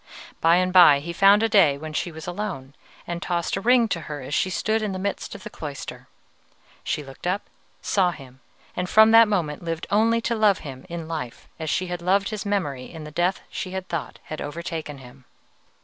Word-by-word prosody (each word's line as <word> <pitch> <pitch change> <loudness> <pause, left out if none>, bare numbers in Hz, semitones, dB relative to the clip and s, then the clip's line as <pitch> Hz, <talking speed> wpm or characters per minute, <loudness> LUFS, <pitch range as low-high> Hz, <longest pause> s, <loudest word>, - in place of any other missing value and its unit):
By 165 +1 +5
and 185 0 +1
by 170 -6 +8
he 170 +4 -6
found 200 +4 +5
a - - +4
day 185 -10 +4
when 155 +1 -7
she 175 - -2
was 160 -1 -9
alone, 175 -8 -5 0.3
and 170 0 -5
tossed 170 -1 -1
a 195 - -3
ring 240 +1 +4
to 175 - -1
her 150 -1 -4
as 130 +3 -7
she 185 - +1
stood 220 +4 0
in 210 -2 -2
the - - -3
midst 200 +1 -4
of 195 - -10
the - - -7
cloister. 145 -3 -8 0.8
She 150 - -2
looked 135 +5 -9
up, 190 +3 0 0.4
saw 190 -3 +2
him, 130 -6 -10 0.4
and 180 0 -2
from 220 +1 +7
that 225 0 +8
moment 170 -7 -1
lived 165 -1 -3
only 225 +3 +3
to 235 - -1
love 215 -3 +3
him 130 0 -9
in 170 -2 -6
life 155 -8 -6
as 160 -1 -3
she 185 - 0
had 175 -1 -5
loved 195 +3 +2
his 215 -1 -5
memory 145 -11 -2
in 160 -2 -9
the 150 - -9
death 175 +4 0
she 185 - -5
had 190 -1 -4
thought 170 -3 -4
had 155 - -7
overtaken 155 -1 -5
him. 130 0 -15
175 Hz, 215 wpm, -24 LUFS, 150-200 Hz, 0.8 s, by